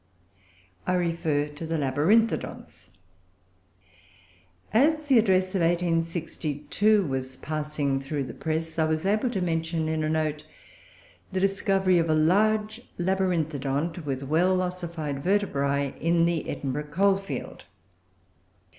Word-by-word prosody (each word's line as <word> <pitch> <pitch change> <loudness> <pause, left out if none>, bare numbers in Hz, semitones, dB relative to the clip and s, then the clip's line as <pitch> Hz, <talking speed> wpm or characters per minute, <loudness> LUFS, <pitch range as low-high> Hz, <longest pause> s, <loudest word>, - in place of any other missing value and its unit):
I 185 - +2
refer 165 -4 0
to 150 +3 -8
the 165 0 -1
Labyrinthodonts. 150 - 0 1.8
As 305 +6 +3
the 270 -5 +5
Address 185 -3 +2
of 190 - 0
1862 165 +2 0
was 130 -2 -4
passing 150 -3 -2
through 140 +1 -3
the 130 - -7
press, 160 +1 -3
I 160 - +4
was 155 +2 -1
able 215 +5 +2
to 200 -6 -2
mention, 165 -1 -1
in 160 0 -1
a 155 - 0
note, 155 -1 -1 0.9
the 190 - -1
discovery 195 -1 +2
of 165 -1 0
a 155 - +3
large 215 +7 +2 0.2
Labyrinthodont, 165 -4 -1
with 135 -2 -3
well 175 +6 +2
ossified 170 -6 -4
vertebrae, 140 -8 0
in 170 +1 +3
the 170 -2 -1
Edinburgh 145 +2 -3
coal 195 +5 +3
field. 195 - -7
165 Hz, 120 wpm, -26 LUFS, 150-190 Hz, 1.8 s, the